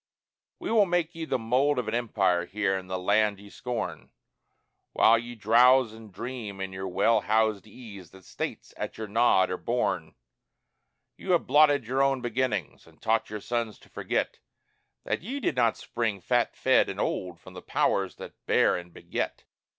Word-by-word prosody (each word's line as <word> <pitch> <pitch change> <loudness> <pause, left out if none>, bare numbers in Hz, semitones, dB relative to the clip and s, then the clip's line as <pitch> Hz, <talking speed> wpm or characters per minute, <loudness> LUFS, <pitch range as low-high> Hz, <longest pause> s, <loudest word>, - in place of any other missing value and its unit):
We - - -5
will 215 -3 +4
make 175 -1 0
ye 165 -1 -5
the 130 - 0
mold 125 +5 +1
of 125 - -2
an 110 - -2
empire 95 -7 +1
here 100 -1 0
in 95 -1 -5
the 95 0 -3
land 100 +2 +2
ye 100 0 -14
scorn, 125 -2 -5 0.8
While 115 +1 +5
ye 120 +1 -8
drowse 120 +2 +5
and 110 -2 -13
dream 110 -1 -6
in 95 0 -4
your 95 0 -5
well 105 +4 +2
housed 110 -1 +1
ease 100 -6 -11
that 95 -2 -17
States - - -6
at - - -5
your 110 - -5
nod 105 -3 +3
are 90 - -2
born. 120 +5 -2 1.0
Ye - - -9
have 175 -2 +3
blotted 145 -4 +4
your 130 +4 0
own 135 -1 +2
beginnings, 120 - -2
and - - -21
taught 115 0 0
your 105 -1 -6
sons 115 -2 -2
to - - -21
forget - - -2 0.6
That - - -2
ye 255 - -5
did 245 - -1
not 115 -3 +2
spring 115 -4 -2
fat 90 - 0
fed - - +3
and - - -6
old 90 -2 -2
from - - -14
the - - -9
powers 95 -1 0
that - - -10
bear - - +4
and 90 -1 -7
beget. - - -4
110 Hz, 180 wpm, -27 LUFS, 100-125 Hz, 1.0 s, While